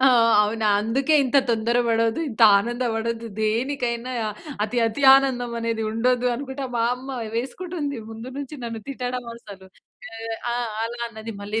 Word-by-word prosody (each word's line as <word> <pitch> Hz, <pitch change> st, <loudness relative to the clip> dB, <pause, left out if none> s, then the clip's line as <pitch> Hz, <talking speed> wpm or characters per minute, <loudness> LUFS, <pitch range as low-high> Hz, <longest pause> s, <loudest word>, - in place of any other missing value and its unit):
"ఆ! -, -, +8 dB, 0.3 s
అవునా. 215 Hz, +1 st, -1 dB
అందుకే 265 Hz, +8 st, +1 dB
ఇంత 260 Hz, +2 st, +1 dB
తొందర 230 Hz, +1 st, +1 dB
పడొద్దు. 230 Hz, +5 st, +1 dB
ఇంత 220 Hz, -, -9 dB, 0.2 s
ఆనందపడొద్దు. 230 Hz, 0 st, -2 dB
దేనికైనా 235 Hz, +2 st, -1 dB, 0.5 s
అతి 240 Hz, +3 st, -2 dB
అతి 225 Hz, +6 st, -3 dB
ఆనందం 250 Hz, -3 st, +1 dB
అనేది 230 Hz, -1 st, -1 dB
ఉండొదు" 245 Hz, +2 st, +1 dB
అనుకుంట 270 Hz, +1 st, -5 dB
మా 230 Hz, -, +1 dB
అమ్మ 260 Hz, 0 st, -6 dB, 0.2 s
వేసుకుంటుంది. 290 Hz, +3 st, -3 dB
ముందు 225 Hz, +3 st, -8 dB
నుంచి 285 Hz, +1 st, -6 dB
నన్ను 230 Hz, -1 st, -5 dB
తిట్టడం 250 Hz, -2 st, -4 dB
అసలు. 200 Hz, -4 st, -12 dB, 0.5 s
ఎ 225 Hz, -, -8 dB, 0.3 s
ఆ! -, -, -1 dB, 0.3 s
అలా 240 Hz, +1 st, -5 dB
అన్నది 220 Hz, -1 st, -8 dB
మళ్ళీ 215 Hz, +2 st, -2 dB
235 Hz, 145 wpm, -23 LUFS, 225-255 Hz, 0.5 s, ఆ